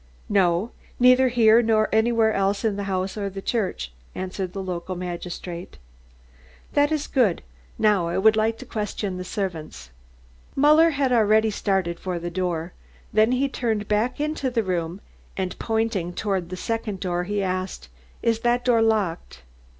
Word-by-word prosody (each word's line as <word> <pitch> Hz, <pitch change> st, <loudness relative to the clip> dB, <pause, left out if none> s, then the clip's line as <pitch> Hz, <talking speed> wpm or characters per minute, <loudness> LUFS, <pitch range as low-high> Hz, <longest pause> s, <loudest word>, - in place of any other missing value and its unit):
"No 190 Hz, +1 st, +2 dB, 0.3 s
neither 255 Hz, +1 st, +6 dB
here 230 Hz, -2 st, +5 dB
nor 220 Hz, -2 st, +2 dB
anywhere 220 Hz, 0 st, +3 dB
else 195 Hz, +3 st, 0 dB
in 215 Hz, -3 st, +1 dB
the 200 Hz, 0 st, -4 dB
house 190 Hz, 0 st, -2 dB
or 200 Hz, -1 st, -2 dB
the 195 Hz, 0 st, -7 dB
church," 190 Hz, -, -2 dB, 0.2 s
answered 185 Hz, 0 st, -4 dB
the 195 Hz, +1 st, -5 dB
local 185 Hz, 0 st, -4 dB
magistrate. 175 Hz, 0 st, -6 dB, 1.0 s
"That 290 Hz, +1 st, +3 dB
is 300 Hz, -2 st, 0 dB
good. 230 Hz, -, +1 dB, 0.3 s
Now 205 Hz, -5 st, +3 dB
I 170 Hz, -, -2 dB
would 215 Hz, +3 st, +5 dB
like 220 Hz, +1 st, +1 dB
to -, -, -10 dB
question 210 Hz, -3 st, -3 dB
the 180 Hz, -, -4 dB
servants." 170 Hz, -, -5 dB, 0.6 s
Muller 305 Hz, +4 st, +6 dB
had 275 Hz, -4 st, 0 dB
already 220 Hz, -1 st, +4 dB
started 190 Hz, -4 st, -1 dB
for 185 Hz, -2 st, -3 dB
the 175 Hz, 0 st, -5 dB
door, 175 Hz, -1 st, -2 dB, 0.4 s
then 220 Hz, +3 st, +4 dB
he 265 Hz, +2 st, +2 dB
turned 225 Hz, -6 st, -2 dB
back 215 Hz, +6 st, 0 dB
into 300 Hz, -3 st, -1 dB
the 235 Hz, -3 st, 0 dB
room 175 Hz, 0 st, -2 dB, 0.4 s
and 185 Hz, -1 st, -3 dB
pointing 220 Hz, -6 st, -1 dB
toward 190 Hz, -3 st, -2 dB
the 185 Hz, -, -5 dB
second 220 Hz, -1 st, -3 dB
door 180 Hz, -1 st, -2 dB
he 205 Hz, +1 st, -1 dB
asked: 185 Hz, -, -3 dB, 0.4 s
"Is 230 Hz, -1 st, +2 dB
that 240 Hz, +1 st, +1 dB
door 240 Hz, -3 st, +4 dB
locked?" 200 Hz, -, -1 dB
205 Hz, 160 wpm, -24 LUFS, 185-230 Hz, 1.0 s, neither